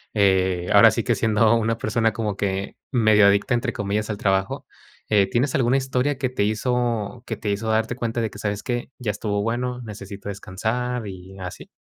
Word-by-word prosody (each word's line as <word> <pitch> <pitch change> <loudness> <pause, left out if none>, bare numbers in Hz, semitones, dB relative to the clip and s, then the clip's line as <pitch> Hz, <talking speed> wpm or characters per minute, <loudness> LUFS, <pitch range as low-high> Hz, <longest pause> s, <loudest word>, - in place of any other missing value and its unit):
eh, 95 -3 +2
ahora - - +9
sí - - -1
que - - +2
siendo 110 0 +3
una 115 0 0
persona 115 0 +1
como 105 -3 -2
que 100 0 -3
medio 110 -4 +5
adicta, 100 +4 +2
entre 120 +1 0
comillas, 105 +1 -2
al 105 - -2
trabajo, 95 -2 0 0.4
eh, 100 -2 +4
¿tienes 130 +2 +1
alguna 130 0 +3
historia 130 +1 0
que 130 -2 -1
te 125 -5 -1
hizo, 115 0 -1
que - - -2
te 105 - -2
hizo 110 +2 -2
darte 110 +2 +1
cuenta 115 -1 -2
de 110 -3 -2
que, 100 - -11
sabes 105 -1 -3
qué, 120 0 -3
ya 115 -4 -2
estuvo 105 0 -2
bueno, 125 +2 -2
necesito 100 -2 -8
descansar 110 +5 -3
y 95 0 -9
así? 90 -1 -8
110 Hz, 195 wpm, -23 LUFS, 100-120 Hz, 0.4 s, ahora